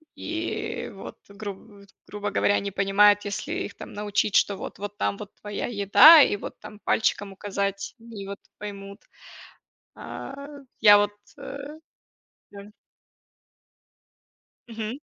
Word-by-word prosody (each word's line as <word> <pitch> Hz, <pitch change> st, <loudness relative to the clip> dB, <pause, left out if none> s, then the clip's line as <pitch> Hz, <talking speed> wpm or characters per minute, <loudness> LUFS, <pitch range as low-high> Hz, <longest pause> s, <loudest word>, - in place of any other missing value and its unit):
и 330 Hz, +1 st, -4 dB
вот, -, -, -10 dB
груб 200 Hz, 0 st, -9 dB
Т 195 Hz, -, -26 dB
грубо 205 Hz, 0 st, -4 dB
говоря, 205 Hz, -, +2 dB
они 200 Hz, 0 st, -2 dB
понимают, 205 Hz, +1 st, +4 dB
если 245 Hz, +10 st, -4 dB
их 375 Hz, +1 st, -4 dB
там -, -, -10 dB
научить, 205 Hz, 0 st, -1 dB
что 200 Hz, -, +3 dB
вот, -, -, -8 dB
вот 205 Hz, 0 st, -6 dB
там 200 Hz, -, -1 dB
вот 210 Hz, -1 st, -9 dB
твоя 205 Hz, -1 st, -4 dB
еда, 240 Hz, -, +8 dB
и 240 Hz, -, +3 dB
вот -, -, -9 dB
там 210 Hz, -, -12 dB
пальчиком 205 Hz, -2 st, 0 dB
указать, 200 Hz, 0 st, -3 dB
и 225 Hz, -4 st, -9 dB
вот 200 Hz, 0 st, -7 dB, 0.2 s
поймут. 200 Hz, -1 st, -8 dB, 1.0 s
А, 270 Hz, -, -8 dB, 0.5 s
я 205 Hz, -1 st, +9 dB
вот, 205 Hz, 0 st, 0 dB, 0.3 s
э, 275 Hz, -, -7 dB, 0.9 s
да. 200 Hz, 0 st, -10 dB, 2.0 s
Мгм. 225 Hz, +1 st, -5 dB
205 Hz, 130 wpm, -25 LUFS, 200-215 Hz, 2.0 s, я